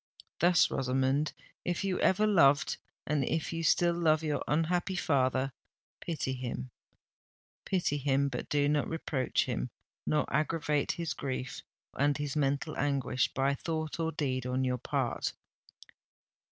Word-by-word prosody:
Thus, 175 Hz, +1 st, +5 dB
Rosamond, 135 Hz, +3 st, +1 dB, 0.3 s
if 175 Hz, +1 st, -1 dB
you 190 Hz, -2 st, 0 dB
ever 210 Hz, +3 st, +3 dB
loved 145 Hz, -9 st, +4 dB, 0.3 s
and 145 Hz, -1 st, +1 dB
if 160 Hz, +5 st, -1 dB
you 165 Hz, -, -2 dB
still 170 Hz, +1 st, +3 dB
love 160 Hz, -2 st, +2 dB
your 150 Hz, -2 st, -1 dB
unhappy 175 Hz, +4 st, +1 dB
father—pity 135 Hz, 0 st, -2 dB
him, 120 Hz, -, -5 dB, 1.0 s
pity 175 Hz, -6 st, +1 dB
him—but 135 Hz, -2 st, 0 dB
do 145 Hz, -1 st, +2 dB
not 145 Hz, -1 st, +1 dB
reproach 150 Hz, -5 st, 0 dB
him—nor 105 Hz, -, -3 dB
aggravate 150 Hz, -1 st, +1 dB
his 170 Hz, -2 st, -3 dB
grief 130 Hz, -2 st, -4 dB, 0.3 s
and 145 Hz, 0 st, +2 dB
his 145 Hz, -1 st, -3 dB
mental 140 Hz, -2 st, 0 dB
anguish 135 Hz, -3 st, +1 dB
by 135 Hz, +1 st, +2 dB
thought 160 Hz, +2 st, -3 dB
or 165 Hz, 0 st, 0 dB
deed 130 Hz, -5 st, -2 dB
on 130 Hz, +1 st, 0 dB
your 125 Hz, -1 st, 0 dB
part!" -, -, -1 dB
145 Hz, 125 wpm, -31 LUFS, 130-165 Hz, 1.0 s, Thus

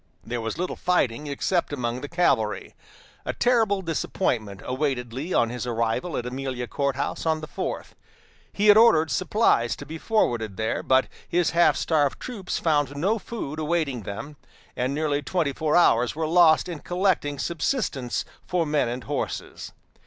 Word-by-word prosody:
There 120 Hz, +4 st, -4 dB
was 110 Hz, 0 st, -4 dB
little 180 Hz, +1 st, -2 dB
fighting 150 Hz, -6 st, 0 dB
except 170 Hz, +5 st, -1 dB
among 125 Hz, -3 st, -2 dB
the 145 Hz, -, -5 dB
cavalry. 115 Hz, -, +1 dB, 0.5 s
A -, -, -3 dB
terrible 225 Hz, -5 st, +2 dB
disappointment 120 Hz, -, -2 dB
awaited 130 Hz, -3 st, -2 dB
Lee 145 Hz, +8 st, -5 dB
on 115 Hz, -7 st, +2 dB
his 125 Hz, 0 st, -4 dB
arrival 115 Hz, +8 st, -1 dB
at 120 Hz, -, -3 dB
Amelia 130 Hz, -1 st, -4 dB
Court 140 Hz, +2 st, -1 dB
House 140 Hz, -, -3 dB
on 160 Hz, -1 st, +2 dB
the 155 Hz, -, -6 dB
fourth. -, -, -5 dB, 0.6 s
He 205 Hz, -, -1 dB
had 205 Hz, -, +9 dB
ordered 165 Hz, -9 st, +5 dB
supplies 185 Hz, -, +2 dB
to -, -, -9 dB
be 160 Hz, +2 st, -7 dB
forwarded 120 Hz, -, 0 dB
there, 110 Hz, 0 st, -1 dB
but 130 Hz, 0 st, +3 dB, 0.2 s
his 175 Hz, -1 st, +2 dB
half 170 Hz, +1 st, +4 dB
starved 145 Hz, -4 st, +1 dB
troops 215 Hz, -7 st, -4 dB
found 145 Hz, -4 st, +1 dB
no 200 Hz, +9 st, +1 dB
food 160 Hz, -9 st, -6 dB
awaiting 155 Hz, -6 st, -1 dB
them, 140 Hz, +10 st, -7 dB, 0.4 s
and 130 Hz, +3 st, -1 dB
nearly 150 Hz, -1 st, 0 dB
twenty 155 Hz, -2 st, -1 dB
four 155 Hz, +2 st, 0 dB
hours 125 Hz, -8 st, +4 dB
were 160 Hz, 0 st, -1 dB
lost 165 Hz, 0 st, +5 dB
in 170 Hz, -4 st, -5 dB
collecting 175 Hz, -6 st, 0 dB
subsistence 155 Hz, -, -2 dB, 0.2 s
for 180 Hz, -2 st, +1 dB
men 150 Hz, -5 st, +1 dB
and 120 Hz, +1 st, -4 dB
horses. -, -, -4 dB
150 Hz, 165 wpm, -25 LUFS, 125-175 Hz, 0.6 s, had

